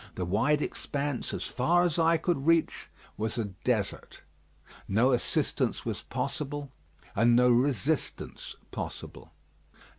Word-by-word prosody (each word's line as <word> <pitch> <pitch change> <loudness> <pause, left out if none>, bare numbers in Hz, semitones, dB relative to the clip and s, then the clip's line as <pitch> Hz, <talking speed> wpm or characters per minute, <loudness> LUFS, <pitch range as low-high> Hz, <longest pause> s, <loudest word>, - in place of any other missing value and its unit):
The 90 - -2
wide 115 - +2
expanse, 140 -2 -3
as - - -3
far 170 +8 +2
as 170 -2 +1
eye 165 0 +4
could 160 -3 -1
reach, 165 -1 +2 0.3
was 110 +2 -2
a 115 - 0 0.2
desert. - - -2 0.6
No 115 +7 +3
assistance 125 - 0
was - - -3
possible, 145 -1 -4 0.4
and 120 +3 +5
no 125 0 +5
resistance 135 +4 0 0.2
possible. - - -7
140 Hz, 120 wpm, -29 LUFS, 120-155 Hz, 0.6 s, and